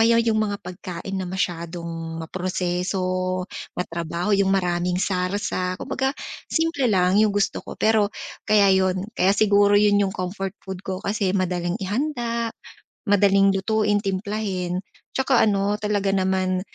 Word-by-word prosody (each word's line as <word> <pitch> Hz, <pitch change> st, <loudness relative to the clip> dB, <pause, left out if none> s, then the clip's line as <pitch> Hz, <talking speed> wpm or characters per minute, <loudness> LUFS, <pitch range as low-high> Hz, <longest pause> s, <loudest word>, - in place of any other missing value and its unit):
kaya 230 Hz, +1 st, +5 dB
yung 220 Hz, -2 st, +1 dB
mga 205 Hz, -1 st, 0 dB
pagkain 180 Hz, 0 st, -7 dB
na 190 Hz, -2 st, -2 dB
masyadong 170 Hz, -2 st, -4 dB
maproseso, 185 Hz, +1 st, -1 dB, 0.3 s
matrabaho, 170 Hz, +2 st, -2 dB
yung 200 Hz, -1 st, +3 dB
maraming 180 Hz, -2 st, +1 dB
sarsa, 185 Hz, 0 st, -1 dB
kumbaga 265 Hz, +7 st, -2 dB, 0.3 s
simple 320 Hz, -6 st, +1 dB
lang 190 Hz, -1 st, +3 dB
yung 215 Hz, -2 st, +3 dB
gusto 205 Hz, -1 st, 0 dB
ko -, -, -9 dB
pero 215 Hz, -2 st, +3 dB, 0.4 s
kaya 205 Hz, -2 st, +5 dB
yun, 185 Hz, -1 st, +2 dB
kaya 195 Hz, 0 st, +3 dB
siguro 205 Hz, -1 st, +4 dB
yun 205 Hz, 0 st, +4 dB
yung 195 Hz, -1 st, 0 dB
comfort 190 Hz, +1 st, -4 dB
food 190 Hz, -1 st, -6 dB
ko 190 Hz, 0 st, -4 dB
kasi 200 Hz, -2 st, 0 dB
madaling 175 Hz, -2 st, -1 dB
ihanda, 235 Hz, +1 st, -1 dB, 0.6 s
madaling 195 Hz, -1 st, +4 dB
lutuin, 210 Hz, +1 st, +1 dB
timplahin, 190 Hz, -2 st, -2 dB, 0.3 s
tsaka 265 Hz, -2 st, +3 dB
ano 205 Hz, +1 st, 0 dB
talaga 205 Hz, -2 st, 0 dB
naman 185 Hz, -1 st, +1 dB
195 Hz, 135 wpm, -23 LUFS, 180-210 Hz, 0.6 s, kaya